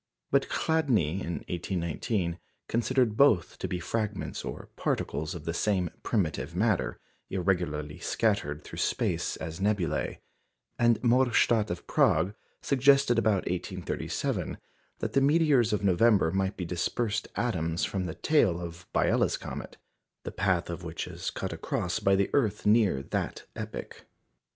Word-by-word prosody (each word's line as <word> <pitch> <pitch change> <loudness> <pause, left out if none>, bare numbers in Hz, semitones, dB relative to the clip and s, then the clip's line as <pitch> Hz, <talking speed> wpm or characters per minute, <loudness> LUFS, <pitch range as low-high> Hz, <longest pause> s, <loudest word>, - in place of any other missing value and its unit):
But - - +2
Chladni, 120 - +1
in 85 -1 -4
1819, 85 +1 -2 0.3
considered 120 -1 +1
both 110 -10 +3
to - - -2
be 90 - -3
fragments 105 +2 -3
or - - -7
particles 75 +3 -2
of 80 -3 -8
the 85 - -1
same 90 -1 0
primitive 95 - -1
matter, - - +1 0.3
irregularly 85 -6 -1
scattered 75 +1 0
through - - -8
space - - 0
as 80 +2 -6
nebulæ; 100 -3 0 0.6
and 120 -1 +4
Morstadt 120 -3 +3
of 90 0 -4
Prague 85 +6 +3 0.3
suggested 135 -3 +4
about 105 -4 +2
1837 90 0 -3 0.4
that - - -3
the 135 - +4
meteors 145 -5 +4
of 105 -1 0
November 100 -2 +4
might 95 +1 -1
be 90 - -3
dispersed 105 +6 -1
atoms 85 -8 0
from 95 -2 -2
the 80 - -5
tail 110 - +2
of 85 +1 -8
Biela's - - +2
comet, - - -7 0.5
the - - -5
path 90 -3 0
of 85 +1 -6
which 80 -1 -4
is - - -5
cut - - -4
across 90 -1 -2
by 100 0 +3
the 100 0 +1
earth 110 -7 +1
near 105 - +4
that - - -3
epoch. - - -7
95 Hz, 140 wpm, -29 LUFS, 85-115 Hz, 0.6 s, and